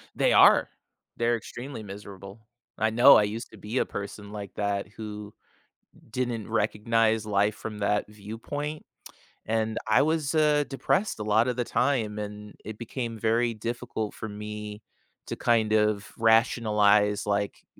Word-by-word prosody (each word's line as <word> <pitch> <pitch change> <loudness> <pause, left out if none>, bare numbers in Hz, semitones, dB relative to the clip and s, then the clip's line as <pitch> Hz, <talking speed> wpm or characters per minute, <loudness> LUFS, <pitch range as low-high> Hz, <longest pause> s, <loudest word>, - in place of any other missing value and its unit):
They - - +3
are. - - +6 0.5
They're 120 0 +2
extremely 120 +1 -7
miserable. 100 +1 -10 0.4
I 110 - +2
know, 120 +5 +8
I - - +4
used 110 +3 -4
to - - -13
be 110 +5 -5
a - - +2
person 100 0 -7
like 100 -2 -7
that 100 -2 -1
who 105 0 -8 0.8
didn't 120 -4 -3
recognize 110 0 +1
life 105 0 +2
from 110 -1 -7
that 105 +1 +1
viewpoint, 115 +9 -6 0.6
and 110 0 -1
I 110 - +5
was, 155 -1 0
uh, 150 -1 +3
depressed 190 - 0
a - - -3
lotta 110 +4 +2
the 125 0 -1
time 120 -5 0
and 105 0 -7
it 110 0 -7
became 120 0 -5
very 115 +2 +1
difficult 115 -1 -4
for 110 - -7
me 105 0 -7 0.5
to - - -4
kind 115 -2 +2
of 105 -1 +1
rationalize, 105 -3 +3
like, 100 -1 -2
110 Hz, 145 wpm, -27 LUFS, 105-120 Hz, 0.8 s, know